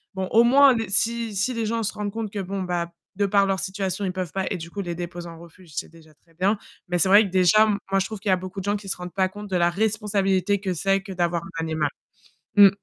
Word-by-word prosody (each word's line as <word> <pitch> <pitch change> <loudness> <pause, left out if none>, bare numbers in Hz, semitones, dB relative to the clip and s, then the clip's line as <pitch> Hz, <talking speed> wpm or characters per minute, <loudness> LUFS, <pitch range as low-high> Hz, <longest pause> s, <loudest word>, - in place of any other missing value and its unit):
Bon, 190 -1 -2
au 230 +1 +6
moins 270 +2 +6
le 225 -1 -1
si 230 +2 +1
si 200 +6 0
les 230 -1 -2
gens 230 +1 -1
se 210 - -2
rendent 205 -1 -4
compte 220 0 -4
que 205 - -4
bon 195 +1 -3
bah 175 -2 -2
p - - -24 0.2
de 200 - +1
par 200 0 +3
leur 195 -1 0
situation, 190 0 -3
ils 185 - -1
peuvent 180 -3 -5
pas 190 -1 -1
et - - -1
du 165 0 -8
coup, 200 +3 -5
les 175 -2 -4
déposer 175 0 -6
en 165 -1 -11
refuge, 170 0 -15
c'est - - -4
déjà 160 -1 -18
très 165 +2 -30
bien. 190 +6 +1 0.3
Mais 175 0 0
c'est 190 - +4
vrai 205 +3 +7
que 195 - -4
déjà, 185 +3 +5
m 215 -2 +1
moi 195 0 +2
je 190 - 0
trouve 215 +1 -6
qu'il 210 - -9
y 195 - +4
a - - +5
beaucoup 185 +2 -7
de 190 - -6
gens 205 - +1
qui 200 -1 -7
se - - -2
rendent 180 0 -8
pas 190 -1 +1
compte 205 +1 -9
de 190 - -1
la 175 -1 +3
responsabilité 200 -1 +1
que 190 -2 -2
c'est 195 +3 +1
que 195 -1 -8
d'avoir 175 -1 0 0.2
un - - 0
animal. 160 -2 -1 0.7
Mmh. 200 -1 +9
195 Hz, 295 wpm, -24 LUFS, 180-205 Hz, 0.7 s, Mmh